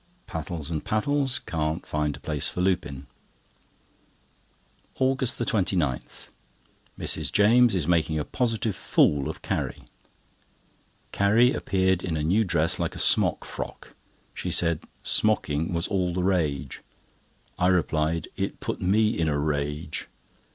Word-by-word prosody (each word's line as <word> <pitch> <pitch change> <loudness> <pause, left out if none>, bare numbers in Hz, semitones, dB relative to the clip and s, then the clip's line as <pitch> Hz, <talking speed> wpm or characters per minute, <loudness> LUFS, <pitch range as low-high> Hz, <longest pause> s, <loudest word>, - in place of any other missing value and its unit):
Pattles 80 0 -5
and 80 -2 -2
Pattles 135 +4 0
can't 80 -5 -3
find 75 -1 -2
a - - -15
place 75 -2 0
for - - -6
Lupin. 85 -7 -1 1.9
AUGUST 130 -1 +1
29.—Mrs. 85 - -3
James 115 +4 +5
is 85 -5 -1
making 80 -2 +2
a 75 - -2
positive 115 -4 -1
fool 70 -5 +2
of - - -7
Carrie. - - -3 1.3
Carrie 115 +6 +4
appeared 95 - +1
in 80 -3 -2
a 75 - -2
new 95 +8 +3
dress 85 -4 +1
like - - -2
a - - -7
smock - - +3
frock. - - -7 0.4
She - - -4
said 85 -2 +2 0.2
"smocking" 80 -8 +1
was 85 -1 -1
all 90 -3 -1
the 90 - 0
rage. 85 -7 -1 0.8
I 90 - +3
replied 85 -3 +1
it - - -3
put - - -4
me 105 +4 +3
in 80 - 0
a 75 - 0
rage. 75 +1 -2
85 Hz, 130 wpm, -26 LUFS, 75-105 Hz, 1.9 s, James